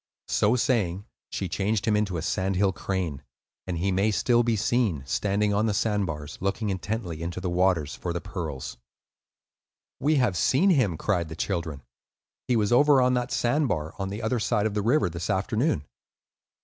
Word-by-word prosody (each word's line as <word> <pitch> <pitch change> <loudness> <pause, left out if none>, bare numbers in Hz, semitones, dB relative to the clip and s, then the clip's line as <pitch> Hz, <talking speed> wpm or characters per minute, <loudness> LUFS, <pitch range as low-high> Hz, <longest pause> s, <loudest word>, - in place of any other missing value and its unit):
So 105 +4 +3
saying, 105 -7 0 0.2
she 95 - -3
changed 105 +4 -1
him 110 - +2
into 105 -4 0
a 80 - -4
sand 95 +2 -1
hill 95 0 +2
crane, 90 -8 -3 0.5
and 90 -2 -2
he 95 +4 0
may 95 +3 +2
still 120 +3 +3
be 120 -1 +1
seen, 110 - +1
standing 105 +8 0
on 105 +2 +2
the 105 - 0
sand 105 -2 +1
bars, 75 -2 -6
looking 100 +2 -1
intently 95 -3 -4
into 85 +2 -4
the 90 -1 -3
water 90 -3 +2
for 85 +4 -5
the 85 - -2
pearls. 75 -9 -6 1.2
"We 150 +3 +2
have 125 -9 +2
seen 140 - +3
him," 115 - +2
cried 85 -5 -1
the 80 - -7
children. 80 -5 -3 0.6
"He 125 - +2
was 105 -1 +1
over 145 +2 +6
on 125 0 +3
that 125 0 0
sand 145 +5 +1
bar, 80 -6 -2
on 95 0 -2
the 105 +3 -5
other 115 +2 0
side 105 -1 +1
of 110 - 0
the 105 - 0
river, 120 +2 +3
this 85 +2 -5
afternoon." 110 - 0
100 Hz, 190 wpm, -26 LUFS, 85-115 Hz, 1.2 s, over